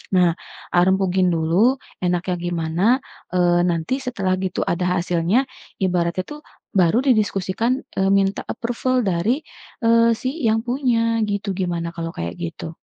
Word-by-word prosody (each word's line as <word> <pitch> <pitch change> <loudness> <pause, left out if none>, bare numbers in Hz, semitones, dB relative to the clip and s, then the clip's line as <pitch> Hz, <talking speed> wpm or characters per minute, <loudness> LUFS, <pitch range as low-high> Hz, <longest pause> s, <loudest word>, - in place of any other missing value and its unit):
Nah, 180 -2 +5 0.4
ah, 175 - +5
rembukin 190 -1 +2
dulu, 170 +10 +3 0.3
enaknya 180 0 0
gimana, 165 0 -2 0.5
eee, 175 -1 +3
nanti 170 +10 -1
setelah 220 -8 -1
gitu 185 -1 -1
ada 175 +1 -1
hasilnya, 175 +7 +1 0.4
ibaratnya, 180 -1 0
tuh, 295 +6 -9 0.3
baru 185 +1 +3
didiskusikan, 215 +1 +1 0.2
eee, 190 - +2
minta 195 0 +2
approval 245 +3 -2
dari, 200 - 0 0.4
eee, 230 0 +5
si 255 - -2 0.2
yang 220 0 +3
punya, 235 -3 +1
gitu. 205 0 -3
Gimana 175 -3 -2
kalau 165 -1 -4
kayak 85 +1 -4
gitu? 160 - -6
185 Hz, 135 wpm, -21 LUFS, 175-230 Hz, 0.5 s, Nah